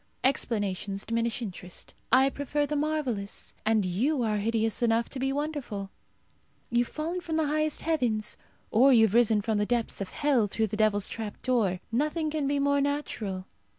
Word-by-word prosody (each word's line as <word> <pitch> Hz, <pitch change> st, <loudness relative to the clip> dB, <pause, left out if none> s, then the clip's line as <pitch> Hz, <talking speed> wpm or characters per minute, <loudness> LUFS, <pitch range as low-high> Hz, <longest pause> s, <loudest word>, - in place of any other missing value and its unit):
Explanations 205 Hz, -6 st, 0 dB
diminish 230 Hz, +1 st, -1 dB
interest. 180 Hz, -3 st, -8 dB, 0.2 s
I 265 Hz, +1 st, +5 dB
prefer 290 Hz, +1 st, -1 dB
the 300 Hz, -, -2 dB
marvellous, 285 Hz, -9 st, -2 dB
and 220 Hz, -3 st, +3 dB
you 245 Hz, -, +1 dB
are 215 Hz, -2 st, +1 dB
hideous 225 Hz, +2 st, 0 dB
enough 230 Hz, 0 st, +2 dB
to 265 Hz, -, -5 dB
be 270 Hz, +1 st, 0 dB
wonderful. 275 Hz, -9 st, -3 dB, 0.8 s
You 240 Hz, +1 st, +3 dB
have -, -, -14 dB
fallen 335 Hz, +4 st, -3 dB
from 330 Hz, -2 st, -3 dB
the 320 Hz, -1 st, +2 dB
highest 305 Hz, +1 st, 0 dB
heavens, 240 Hz, -10 st, 0 dB, 0.4 s
or 260 Hz, +5 st, +6 dB
you 225 Hz, -3 st, +7 dB
have 210 Hz, -, -1 dB
risen 225 Hz, -3 st, +4 dB
from 220 Hz, -1 st, 0 dB
the 210 Hz, -, +2 dB
depths 235 Hz, -4 st, -1 dB
of 195 Hz, -, -3 dB
hell 265 Hz, -3 st, +2 dB
through 220 Hz, +2 st, 0 dB
the -, -, +2 dB
devil's 210 Hz, -2 st, +2 dB
trap 220 Hz, -2 st, -6 dB
door. 210 Hz, -8 st, +1 dB
Nothing 305 Hz, +5 st, 0 dB
can 300 Hz, -2 st, -1 dB
be 285 Hz, +1 st, +1 dB
more 280 Hz, 0 st, +2 dB
natural. 225 Hz, -10 st, -2 dB
235 Hz, 180 wpm, -28 LUFS, 215-285 Hz, 0.8 s, you